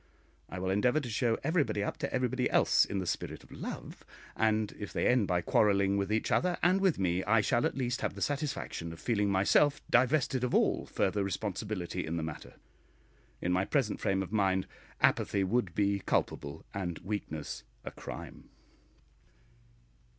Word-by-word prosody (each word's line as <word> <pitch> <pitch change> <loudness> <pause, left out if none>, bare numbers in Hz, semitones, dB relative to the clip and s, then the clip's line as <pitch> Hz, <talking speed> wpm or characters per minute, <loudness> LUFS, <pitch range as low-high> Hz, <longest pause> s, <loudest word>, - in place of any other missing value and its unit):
I 90 - -6
will 95 +1 -1
endeavour 125 +9 +3
to 130 -5 -5
show 115 +1 +1
everybody 150 - +1
up - - -3
to - - -3
everybody 125 0 0
else - - +4
in 100 - -4
the 95 - -2
spirit 85 - -4
of - - -19
love; - - -7 0.3
and 110 -1 +1
if 105 - -6
they - - -1
end 125 -5 +3
by 90 -1 +1
quarrelling 100 0 +3
with 100 0 -1
each 110 - 0
other 180 -1 +2
and 185 +3 +4
with 190 -4 +3
me, 90 -1 0
I 110 +1 +4
shall 120 +2 +2
at - - -6
least 125 -1 -1
have - - -2
the - - -8
satisfaction 140 - -3
of 80 - -11
feeling 105 -4 +1
myself 100 +10 +3
divested 130 0 +3
of 125 - 0
all - - +2
further 100 -1 0
responsibility 95 -2 -3
in 80 +2 -3
the 80 - -2
matter. 80 -1 -7 0.9
In 90 - +1
my 90 +1 +2
present 125 0 0
frame 95 0 +1
of 95 - -9
mind 95 -3 +2 0.4
apathy 100 -1 +3
would 95 -2 0
be 100 -1 +2
culpable 75 -4 -2
and 90 -4 -3
weakness 80 - -4 0.2
a - - -5
crime.... - - -9
105 Hz, 175 wpm, -31 LUFS, 95-125 Hz, 0.9 s, else